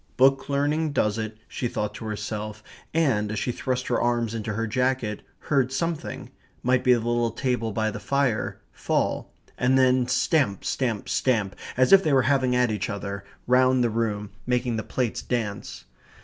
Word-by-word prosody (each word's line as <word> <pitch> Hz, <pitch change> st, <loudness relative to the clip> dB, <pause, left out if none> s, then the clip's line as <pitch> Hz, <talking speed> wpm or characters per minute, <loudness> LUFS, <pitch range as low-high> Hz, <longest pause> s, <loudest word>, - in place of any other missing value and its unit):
"Book 135 Hz, +2 st, +4 dB
learning 145 Hz, +2 st, +1 dB
does 105 Hz, -4 st, +1 dB
it," 110 Hz, 0 st, -4 dB
she 125 Hz, -, -3 dB
thought 105 Hz, -2 st, -3 dB
to -, -, -8 dB
herself, 105 Hz, 0 st, -5 dB, 0.3 s
and, 125 Hz, -11 st, +1 dB
as 110 Hz, -, -3 dB
she 125 Hz, -, -1 dB
thrust 125 Hz, +1 st, -2 dB
her 120 Hz, -, 0 dB
arms 120 Hz, -2 st, +1 dB
into 110 Hz, -1 st, -3 dB
her 115 Hz, +1 st, -1 dB
jacket, 125 Hz, -2 st, 0 dB, 0.2 s
heard 135 Hz, -3 st, +1 dB
something 165 Hz, +3 st, -3 dB, 0.3 s
might 125 Hz, 0 st, +2 dB
be 125 Hz, -1 st, +6 dB
the -, -, 0 dB
little 120 Hz, 0 st, +1 dB
table 115 Hz, -1 st, -1 dB
by 110 Hz, +1 st, 0 dB
the 105 Hz, -, -6 dB
fire 130 Hz, +1 st, 0 dB
fall; -, -, -1 dB, 0.3 s
and 130 Hz, +2 st, +3 dB
then 130 Hz, -1 st, +4 dB
stamp, 125 Hz, -, +1 dB
stamp, 115 Hz, -6 st, -1 dB
stamp 105 Hz, -7 st, +1 dB, 0.2 s
as 130 Hz, +7 st, +5 dB
if 195 Hz, 0 st, +8 dB
they 155 Hz, -, +2 dB
were 130 Hz, -2 st, +5 dB
having 130 Hz, -2 st, +2 dB
at 125 Hz, -2 st, +3 dB
each 105 Hz, -, -2 dB
other 100 Hz, 0 st, -4 dB, 0.2 s
round 130 Hz, 0 st, +4 dB
the 120 Hz, -, +1 dB
room, 105 Hz, -2 st, -2 dB, 0.2 s
making 125 Hz, -1 st, +1 dB
the 110 Hz, -, -1 dB
plates 120 Hz, 0 st, -2 dB
dance. 110 Hz, -5 st, -4 dB
120 Hz, 175 wpm, -25 LUFS, 110-130 Hz, 0.3 s, if